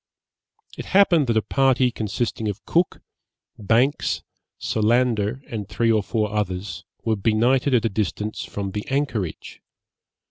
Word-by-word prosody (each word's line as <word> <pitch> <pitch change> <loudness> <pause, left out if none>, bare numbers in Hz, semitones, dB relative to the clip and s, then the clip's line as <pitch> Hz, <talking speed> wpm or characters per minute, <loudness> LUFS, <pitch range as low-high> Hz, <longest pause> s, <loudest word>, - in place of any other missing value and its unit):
It - - -5
happened 170 -8 +5
that 115 -1 +2
a 110 - +2
party, 130 -2 +2
consisting 110 0 -2
of 105 0 -5
Cook, 175 +2 +1 0.6
Banks, 115 +7 +1 0.3
Solander, 115 +1 +1
and 105 -3 -6
three 115 +2 +1
or 110 -1 +3
four 105 0 -2
others, 100 -1 -3 0.2
were 110 - +2
benighted 120 +6 +2
at 115 -1 +2
a - - +2
distance 105 +1 -2
from 100 -1 -5
the 105 +1 -5
anchorage. 135 - -3
110 Hz, 135 wpm, -23 LUFS, 105-125 Hz, 0.6 s, happened